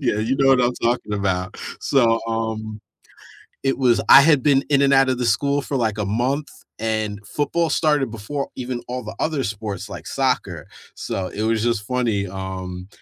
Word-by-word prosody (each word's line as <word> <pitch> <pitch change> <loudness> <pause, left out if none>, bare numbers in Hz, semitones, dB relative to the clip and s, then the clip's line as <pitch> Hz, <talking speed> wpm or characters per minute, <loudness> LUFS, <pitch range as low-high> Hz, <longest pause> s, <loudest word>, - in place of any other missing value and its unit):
yeah, 120 -6 0
you 120 +5 0
know 135 0 +3
what 130 -2 +5
I'm 120 0 +2
talking 120 -3 0
about, 95 0 -2 0.2
so, 115 -4 +3
um, 110 -1 -3 0.8
it 135 - +1
was 125 -3 +3
I 140 - +10
had 150 -2 +4
been 140 0 +3
in 140 -1 +4
and 140 0 +4
out 135 -1 +5
of 130 - 0
the 125 - 0
school 140 +6 +1
for 140 0 -3
like 110 -3 -1
a 105 - -1
month, 130 +8 -1 0.3
and 110 -2 -2
football 160 +3 0
started 150 -3 +1
before 115 +6 -5
even 125 -1 -4
all 125 0 -4
the 110 - -8
other 155 -4 0
sports 105 -3 -5
like - - -8
soccer, - - -1 0.3
so 95 -1 -4
it 105 - -4
was 110 0 +1
just 115 -3 0
funny, 115 -5 0
um, 95 -1 -6
120 Hz, 190 wpm, -21 LUFS, 105-135 Hz, 0.8 s, I